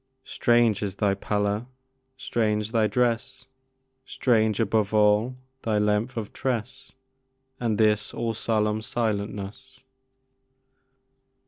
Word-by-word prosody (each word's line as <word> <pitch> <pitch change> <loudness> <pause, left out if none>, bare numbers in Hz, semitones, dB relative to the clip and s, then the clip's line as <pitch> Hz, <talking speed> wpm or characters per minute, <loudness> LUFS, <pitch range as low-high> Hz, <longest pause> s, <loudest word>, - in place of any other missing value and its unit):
Strange 120 -3 +2
is 100 -2 -3
thy 100 -1 +1
pallor! 105 +3 -1 0.5
strange 110 -4 -1
thy 110 -2 +3
dress! 120 +3 -1 0.6
Strange, 110 -5 +1
above 110 -1 +1
all, 105 +4 +3 0.2
thy 110 -2 0
length 105 +4 0
of 110 -2 -4
tress, 125 -2 -3 0.7
And 115 -3 0
this 105 -1 +2
all 115 -1 -2
solemn 110 -1 0
silentness! 110 +2 -4
110 Hz, 100 wpm, -25 LUFS, 105-115 Hz, 0.7 s, thy